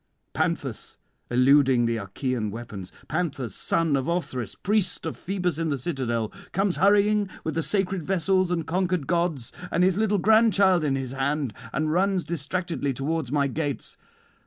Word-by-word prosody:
Panthus, - - -2 0.3
eluding 130 0 +4
the 115 0 0
Achaean 110 +2 -2
weapons, 105 -4 -7 0.2
Panthus 145 - -2
son 165 +5 +1
of 135 -1 0
Othrys, 130 - -2
priest 200 -3 +1
of - - -3
Phoebus 180 -4 -2
in 165 -1 0
the 140 - 0
citadel, 120 -6 -2 0.2
comes 195 -1 +1
hurrying 205 +1 +3
with 160 - -2
the 165 - 0
sacred 190 0 0
vessels 185 +1 +1
and 170 -3 -1
conquered 180 -2 0
gods 165 -6 -1 0.2
and 175 - +2
his 185 0 +3
little 210 -1 +2
grandchild 200 -3 +4
in 140 -3 +1
his 135 -2 -3
hand, 135 -2 -1 0.2
and 155 +1 -1
runs 190 +1 +2
distractedly 165 -3 -2
towards 145 0 -2
my 145 -1 +2
gates. 140 0 -3
160 Hz, 155 wpm, -25 LUFS, 135-185 Hz, 0.3 s, eluding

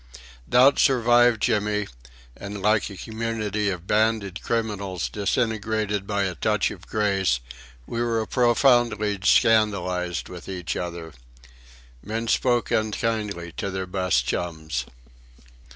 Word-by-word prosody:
Doubt 130 +3 +5
survived 120 -3 +4
Jimmy; 105 -3 +1 0.5
and, 100 0 -7
like 105 +2 +2
a 100 - -10
community 110 -1 -2
of 90 -2 -5
banded 105 -2 0
criminals 100 -6 -2
disintegrated 105 -1 -1
by 100 -1 0
a 95 -2 -1
touch 80 - 0
of - - -11
grace, 95 - +1 0.5
we 115 - -3
were 115 -2 0
profoundly 120 -4 +2
scandalised 90 -6 +2
with 90 0 -10
each 90 -7 -4
other. 85 -2 -5 0.9
Men 115 +3 -4
spoke 120 0 +1
unkindly 105 -5 -1
to 100 - -2
their 95 0 -3
best 90 -9 0
chums. 80 -7 -3
105 Hz, 115 wpm, -24 LUFS, 95-115 Hz, 0.9 s, Doubt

